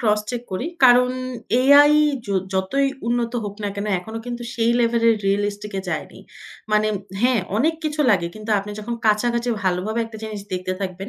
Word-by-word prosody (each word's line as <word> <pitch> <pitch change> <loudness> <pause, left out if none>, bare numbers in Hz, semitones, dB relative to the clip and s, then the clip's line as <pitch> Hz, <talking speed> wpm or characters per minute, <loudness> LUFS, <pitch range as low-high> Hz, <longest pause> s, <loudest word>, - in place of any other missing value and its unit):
Cross 210 -3 +2
check 240 -1 -4
করি। 215 - -2 0.2
কারণ 250 0 +6 0.5
AI 285 +2 +7 0.3
য - - -14 0.3
যতই 270 +9 +1 0.2
উন্নত 240 0 0
হোক 205 -1 -5
না - - 0
কেন। 200 +1 -3
এখনো 220 +5 -7
কিন্তু 240 0 -5
সেই 230 0 +2
লেভেলের 230 -1 +3
রিয়ালিস্টিক 205 +1 -1
এ - - -1
যায়নি। 160 -3 -5 0.5
মানে 215 0 +3 0.3
হ্যাঁ, 250 -4 +3 0.2
অনেক 315 +8 +2
কিছু 305 0 -2
লাগে। 185 -5 +2
কিন্তু 215 +1 -7
আপনি 205 +1 -6
যখন 235 +3 -4
কাছাকাছি 235 +3 +1 0.2
ভালোভাবে 190 +5 0
একটা 225 -1 -10
জিনিস 215 -2 -5
দেখতে 185 0 -2
থাকবেন, 190 +1 -5
220 Hz, 175 wpm, -22 LUFS, 200-240 Hz, 0.5 s, AI